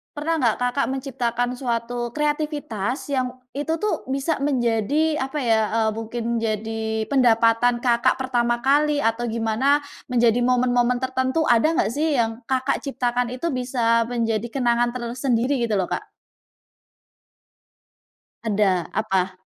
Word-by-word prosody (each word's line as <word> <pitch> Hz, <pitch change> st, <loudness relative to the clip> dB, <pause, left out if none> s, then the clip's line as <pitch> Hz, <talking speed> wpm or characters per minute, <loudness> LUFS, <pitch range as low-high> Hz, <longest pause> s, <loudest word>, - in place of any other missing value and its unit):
pernah 315 Hz, +3 st, -1 dB
nggak 235 Hz, -5 st, +2 dB
Kakak 250 Hz, +3 st, 0 dB
menciptakan 245 Hz, -3 st, -2 dB
suatu 240 Hz, -1 st, -3 dB
kreativitas 295 Hz, -6 st, -2 dB
yang 255 Hz, -2 st, +1 dB, 0.3 s
itu 295 Hz, +3 st, -2 dB
tuh 425 Hz, 0 st, -1 dB
bisa 275 Hz, +4 st, -1 dB
menjadi 270 Hz, +4 st, +1 dB
apa 270 Hz, +3 st, -3 dB
ya, 230 Hz, -4 st, +2 dB, 0.2 s
eee, 220 Hz, -1 st, +2 dB
mungkin 225 Hz, +1 st, -5 dB, 0.2 s
jadi 220 Hz, 0 st, -2 dB
pendapatan 240 Hz, -1 st, +3 dB
Kakak 240 Hz, +1 st, +3 dB
pertama 240 Hz, -2 st, 0 dB
kali 290 Hz, +2 st, +3 dB
atau 230 Hz, +2 st, 0 dB
gimana 230 Hz, +6 st, +2 dB, 0.3 s
menjadi 240 Hz, -1 st, +3 dB
momen-momen 245 Hz, 0 st, +2 dB
tertentu 260 Hz, +4 st, 0 dB
ada 245 Hz, +7 st, +3 dB
nggak 210 Hz, -, +1 dB
sih 300 Hz, +3 st, 0 dB
yang 225 Hz, 0 st, 0 dB
Kakak 260 Hz, +1 st, 0 dB
ciptakan 245 Hz, -3 st, -1 dB
itu 335 Hz, -, -3 dB
bisa 240 Hz, -3 st, +1 dB
menjadi 230 Hz, -2 st, -1 dB
kenangan 240 Hz, -2 st, +1 dB
tersendiri 250 Hz, +2 st, 0 dB
gitu 225 Hz, -3 st, 0 dB
loh, 180 Hz, -, 0 dB
Kak? -, -, -4 dB, 2.3 s
Ada, 200 Hz, -5 st, +1 dB
apa? 185 Hz, -1 st, 0 dB
245 Hz, 125 wpm, -23 LUFS, 230-270 Hz, 2.3 s, pendapatan